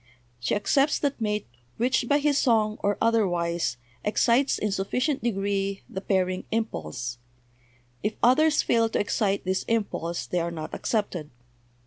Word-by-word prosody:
"She 120 Hz, -, 0 dB
accepts 275 Hz, +8 st, +2 dB
that 280 Hz, -4 st, -2 dB
mate 210 Hz, -1 st, -1 dB, 0.3 s
which 245 Hz, 0 st, +1 dB
by 285 Hz, -, +5 dB
his 290 Hz, -1 st, +2 dB
song 220 Hz, -3 st, +2 dB
or 205 Hz, 0 st, +1 dB
otherwise 175 Hz, -, +1 dB, 0.3 s
excites 235 Hz, +5 st, +3 dB
in 210 Hz, -, -1 dB
sufficient 250 Hz, +9 st, 0 dB
degree 195 Hz, -3 st, -1 dB
the 190 Hz, -, -6 dB
pairing 185 Hz, -2 st, 0 dB
impulse; 120 Hz, -, -3 dB, 0.8 s
if 210 Hz, +1 st, -1 dB
others 300 Hz, +6 st, +5 dB
fail 230 Hz, -1 st, +2 dB
to -, -, -1 dB
excite 205 Hz, -1 st, 0 dB
this 185 Hz, 0 st, 0 dB
impulse 195 Hz, -7 st, -1 dB
they 180 Hz, -, -1 dB
are 170 Hz, 0 st, -1 dB
not 160 Hz, -2 st, -6 dB
accepted. 190 Hz, -9 st, -2 dB
210 Hz, 140 wpm, -26 LUFS, 185-235 Hz, 0.8 s, by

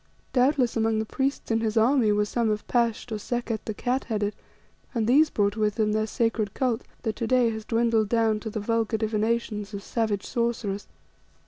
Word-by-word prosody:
Doubtless 255 Hz, -1 st, +3 dB
among 225 Hz, -1 st, +1 dB
the 220 Hz, -, 0 dB
priests 270 Hz, +2 st, -2 dB
in 225 Hz, -, +3 dB
his 220 Hz, 0 st, -1 dB
army 230 Hz, -1 st, +4 dB
were 210 Hz, 0 st, +2 dB
some 230 Hz, +1 st, 0 dB
of 210 Hz, 0 st, -2 dB
Pasht 235 Hz, -1 st, 0 dB
or 215 Hz, -, -2 dB
Sekket 235 Hz, 0 st, -2 dB
the 215 Hz, -, -3 dB
Cat 255 Hz, +4 st, -1 dB
headed, 210 Hz, -2 st, -1 dB, 0.6 s
and 225 Hz, -2 st, +1 dB
these 290 Hz, +7 st, +5 dB
brought 205 Hz, -4 st, +1 dB
with 210 Hz, -2 st, 0 dB
them 215 Hz, -1 st, +1 dB
their 215 Hz, 0 st, 0 dB
secret 225 Hz, -2 st, -1 dB
cult, 250 Hz, -3 st, 0 dB, 0.2 s
that 220 Hz, -3 st, -1 dB
to 230 Hz, -, -2 dB
day 245 Hz, -1 st, +3 dB
has 220 Hz, -1 st, -6 dB
dwindled 225 Hz, -2 st, +2 dB
down 225 Hz, -2 st, +2 dB
to 220 Hz, -, -5 dB
the 215 Hz, -, -4 dB
vulgar 225 Hz, +1 st, 0 dB
divinations 215 Hz, -1 st, -1 dB
of 200 Hz, -, -6 dB
savage 215 Hz, -4 st, -1 dB
sorcerers. 235 Hz, -5 st, -2 dB
225 Hz, 195 wpm, -26 LUFS, 215-235 Hz, 0.6 s, these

